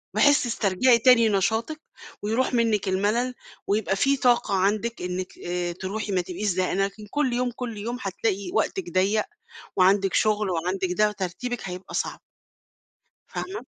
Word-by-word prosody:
بحيث 285 -1 +5
تسترجِعي 235 +1 +3
تاني 230 -2 +6
نشاطِك، 220 - 0 0.4
ويرُوح 225 +6 0
منِك 225 -5 +1
المَلل، 210 +7 +1 0.3
ويبقى 200 -1 +1
في 275 +7 +2
طاقة 245 -5 +2
عندِك 210 +5 0
إنِك 180 +1 -4
آآ، 175 0 -2
ترُوحي 200 +3 -4
ما 185 -1 +2
تبقيش 185 +4 -4
زهقانة، 185 +1 +1
لكن 210 +1 -8
كلّ 290 -4 +1
يوم، 245 0 0
كلّ 245 -4 -5
يوم 235 +4 -4
هتلاقي 200 - -2
وقتِك 385 -3 -1
ضيّق، 195 +4 +2 0.5
وعَندِك 195 +1 +4
شُغل، 210 -2 +2
وعَندِك 180 +2 -1
ده، 210 0 +4
وترتيبِك 210 +5 -4
هيبقى 180 +1 -8
صعب. - - -2 1.1
فاهمة؟ 395 +4 -5
210 Hz, 145 wpm, -25 LUFS, 190-240 Hz, 1.1 s, تاني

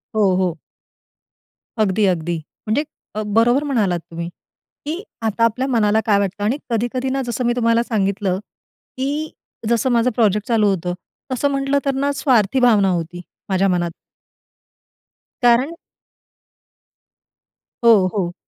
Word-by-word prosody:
हो, 200 -4 +3
हो. 180 -3 0 1.2
अगदी, 205 0 +2
अगदी. 170 0 -3 0.3
म्हणजे 250 +8 +1 0.5
बरोबर 240 +5 +4
म्हणालात 210 -11 0
तुम्ही, 170 +1 -5 0.6
की 320 +5 -3 0.2
आता 225 +1 0
आपल्या 250 +4 +1
मनाला 220 -4 +2
काय 205 -2 +3
वाटतं. 200 +1 -2
आणि 235 +7 +1
कधी-कधी 240 +3 -1
ना, 270 +1 -1
जसं 240 +1 -2
मी 240 - +2
तुम्हाला 230 -1 +2
सांगितलं, 200 -4 -1 0.6
की 290 +4 -2 0.4
जसं 235 +2 +2
माझं 235 +1 +3
प्रोजेक्ट 210 -2 +2
चालू 220 -3 +3
होतं, 180 -2 -1 0.4
तसं 280 +3 +1
म्हटलं 275 0 +1
तर 275 - +1
ना 280 +2 0
स्वार्थी 250 -4 +2
भावना 215 -6 +4
होती, 175 0 -3 0.3
माझ्या 190 +1 +2
मनात. 175 -2 0 1.5
कारण 245 +5 +4 2.1
हो, 220 -5 +6
हो. 180 -4 -1
225 Hz, 125 wpm, -20 LUFS, 195-255 Hz, 2.1 s, हो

